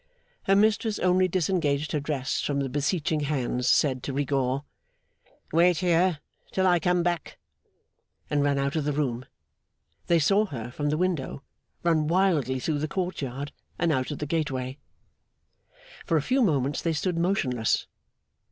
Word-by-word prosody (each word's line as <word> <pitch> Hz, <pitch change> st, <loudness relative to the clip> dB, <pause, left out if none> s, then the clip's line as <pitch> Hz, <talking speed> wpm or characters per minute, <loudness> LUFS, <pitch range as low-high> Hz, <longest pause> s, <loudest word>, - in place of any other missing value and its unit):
Her 195 Hz, -, +4 dB
mistress 215 Hz, +1 st, +2 dB
only 185 Hz, +1 st, +3 dB
disengaged 160 Hz, -5 st, 0 dB
her 150 Hz, -, 0 dB
dress 140 Hz, -2 st, -2 dB
from 140 Hz, -1 st, -1 dB
the 135 Hz, -1 st, -1 dB
beseeching 150 Hz, +3 st, 0 dB
hands, 130 Hz, -4 st, -1 dB
said 130 Hz, -4 st, +3 dB
to 135 Hz, -, -4 dB
Rigaud, 135 Hz, -1 st, 0 dB, 0.9 s
'Wait 170 Hz, +1 st, +4 dB
here 175 Hz, -1 st, +2 dB, 0.3 s
till 190 Hz, -, +1 dB
I 175 Hz, -2 st, +4 dB
come 180 Hz, +1 st, +1 dB
back!' 175 Hz, -2 st, -2 dB, 0.9 s
and 145 Hz, -1 st, +1 dB
ran 140 Hz, -1 st, +2 dB
out 140 Hz, +3 st, -1 dB
of 155 Hz, -, 0 dB
the 145 Hz, 0 st, -1 dB
room. 130 Hz, -4 st, -1 dB, 0.8 s
They 170 Hz, -, +4 dB
saw 200 Hz, +7 st, +3 dB
her, 120 Hz, -, -6 dB
from 145 Hz, +3 st, -2 dB
the 150 Hz, -, 0 dB
window, 165 Hz, -6 st, -2 dB, 0.4 s
run 160 Hz, -3 st, +2 dB
wildly 160 Hz, -8 st, +2 dB
through 150 Hz, +3 st, -1 dB
the 155 Hz, -, -1 dB
court 180 Hz, 0 st, -3 dB
yard 135 Hz, +2 st, -4 dB, 0.3 s
and 170 Hz, -1 st, +1 dB
out 130 Hz, 0 st, 0 dB
at 145 Hz, -, -4 dB
the 150 Hz, -, -3 dB
gateway. 135 Hz, -4 st, -2 dB, 1.3 s
For 165 Hz, -, +3 dB
a -, -, +2 dB
few 260 Hz, -, +2 dB
moments 145 Hz, -, +1 dB
they 165 Hz, -2 st, 0 dB
stood 170 Hz, +2 st, -1 dB
motionless. 130 Hz, -, +1 dB
150 Hz, 160 wpm, -26 LUFS, 140-175 Hz, 1.3 s, Her